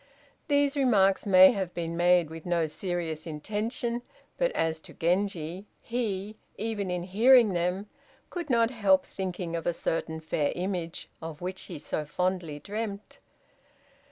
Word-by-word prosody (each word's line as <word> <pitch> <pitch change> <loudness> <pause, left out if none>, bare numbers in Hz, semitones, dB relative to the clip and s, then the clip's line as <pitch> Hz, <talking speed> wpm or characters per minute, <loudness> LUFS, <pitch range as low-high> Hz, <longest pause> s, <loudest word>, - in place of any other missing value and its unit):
These 285 -1 +2
remarks 205 -9 +3
may 185 -1 +9
have 190 -6 -3
been 170 -1 -3
made 175 -2 +4
with 160 -1 -8
no 170 -2 +1
serious 165 -1 -3
intention, 225 - -2 0.3
but - - +1
as 160 -1 0
to - - -13
Genji, 180 +1 -1
he, 215 -3 -3 0.2
even 210 -3 -2
in 180 -1 -2
hearing 225 +3 +5
them, 180 +4 -1 0.4
could 345 -4 -5
not 230 -2 +3
help 200 -6 +3
thinking 180 -3 -4
of 165 - -3
a 175 - +2
certain 160 -1 -2
fair 155 -2 -1
image 175 -2 -3
of 160 -2 -7
which 185 +1 -4
he - - -7
so 150 +1 -3
fondly 175 0 -2
dreamt. 205 +4 -6
185 Hz, 145 wpm, -28 LUFS, 170-215 Hz, 0.4 s, may